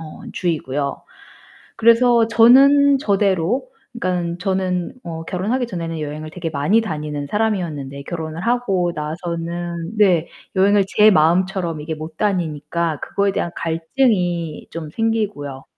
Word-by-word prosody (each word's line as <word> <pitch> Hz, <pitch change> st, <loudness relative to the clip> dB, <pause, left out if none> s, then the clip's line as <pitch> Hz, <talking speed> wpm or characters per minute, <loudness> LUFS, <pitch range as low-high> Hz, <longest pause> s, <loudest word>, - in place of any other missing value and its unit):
어 155 Hz, -1 st, -10 dB
주의고요. 145 Hz, -5 st, -2 dB, 0.7 s
그래서 230 Hz, 0 st, +4 dB
저는 275 Hz, +5 st, +6 dB
저대로 200 Hz, -, +1 dB, 0.3 s
그니깐 180 Hz, -6 st, -2 dB
저는 185 Hz, -2 st, -1 dB
어 165 Hz, -1 st, -6 dB
결혼하기 215 Hz, +9 st, -1 dB
전에는 165 Hz, -6 st, -5 dB
여행을 155 Hz, +1 st, -5 dB
되게 165 Hz, 0 st, -5 dB
많이 155 Hz, +10 st, +2 dB
다니는 150 Hz, -7 st, -4 dB
사람이었는데 170 Hz, -11 st, -2 dB
결혼을 160 Hz, +2 st, -5 dB
하고 195 Hz, -8 st, 0 dB
나서는 170 Hz, +3 st, -4 dB
네 180 Hz, -6 st, +3 dB, 0.3 s
여행을 200 Hz, +1 st, +4 dB
제 210 Hz, +2 st, +5 dB
마음처럼 175 Hz, -1 st, +2 dB
이게 155 Hz, +2 st, -4 dB
못 155 Hz, +1 st, -9 dB
다니니까 170 Hz, -4 st, -1 dB
그거에 200 Hz, 0 st, 0 dB
대한 175 Hz, -, -2 dB
갈등이 170 Hz, -, -1 dB
좀 160 Hz, -2 st, -6 dB
생기고요. 205 Hz, -, -2 dB
175 Hz, 300 characters per minute, -20 LUFS, 160-210 Hz, 0.7 s, 저는